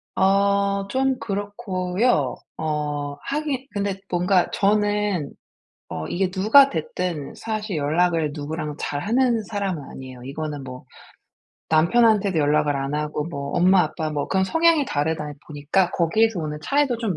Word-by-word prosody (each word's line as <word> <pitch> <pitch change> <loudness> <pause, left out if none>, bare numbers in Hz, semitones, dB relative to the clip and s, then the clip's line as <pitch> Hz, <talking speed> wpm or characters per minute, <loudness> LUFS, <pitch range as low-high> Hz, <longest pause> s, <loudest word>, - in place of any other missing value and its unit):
아 200 +1 +2
좀 265 +1 +1
그렇고요. 200 - -1 0.2
어 150 -2 -2
하긴 280 -2 -3
근데 200 -2 -2
뭔가 180 +1 +2
저는 205 -5 +1 0.6
어 80 -1 -5
이게 185 0 0
누가 220 +9 +6
됐든 160 -2 -3
사실 215 -4 -3
연락을 160 +1 +1
누구랑 150 0 -4
잘 145 0 -3
하는 235 - +2
사람은 190 -5 -3
아니에요. 130 -2 -10
이거는 145 +1 -5
뭐 125 0 -9 0.8
남편한테도 200 +2 +3
연락을 150 -1 +2
안 135 +1 -3
하고 150 0 -2
뭐 140 -4 -5
엄마 180 +1 +5
아빠 155 -2 -3
뭐 145 -1 -2
그런 190 0 +2
성향이 325 - +3
다르다 150 - -2
보니까 155 +5 0
거기에서 195 +3 +2
오는 150 -1 -4
차이도 280 -4 +1
좀 210 -8 -2
180 Hz, 285 characters per minute, -23 LUFS, 150-210 Hz, 0.8 s, 누가